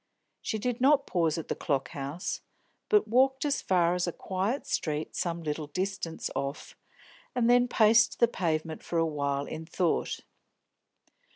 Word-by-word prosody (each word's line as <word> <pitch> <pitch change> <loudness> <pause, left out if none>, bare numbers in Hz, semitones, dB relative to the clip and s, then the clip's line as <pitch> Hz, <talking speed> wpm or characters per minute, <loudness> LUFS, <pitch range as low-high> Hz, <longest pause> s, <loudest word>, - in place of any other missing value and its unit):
She 220 - -2
did 245 +3 -2
not 280 +1 +5
pause 165 -4 +1
at 165 - -5
the - - -1
Clock 135 -5 -1
House, 145 +6 -4 0.5
but 420 -3 +4
walked 265 +4 +3
as 285 -1 +1
far 175 -2 +2
as 180 0 0
a - - 0
quiet 195 +10 -2
street 155 -1 -2
some 170 -1 -2
little 150 0 -3
distance 185 +1 -3
off, 140 +1 -4 0.6
and 240 -2 +2
then 245 0 +5
paced 225 -1 +4
the 235 - +6
pavement 160 -6 -2
for 170 - -3
a 165 - +3
while, 140 -2 -1
in 160 +1 -6
thought. 175 0 0
175 Hz, 160 wpm, -29 LUFS, 155-230 Hz, 0.6 s, the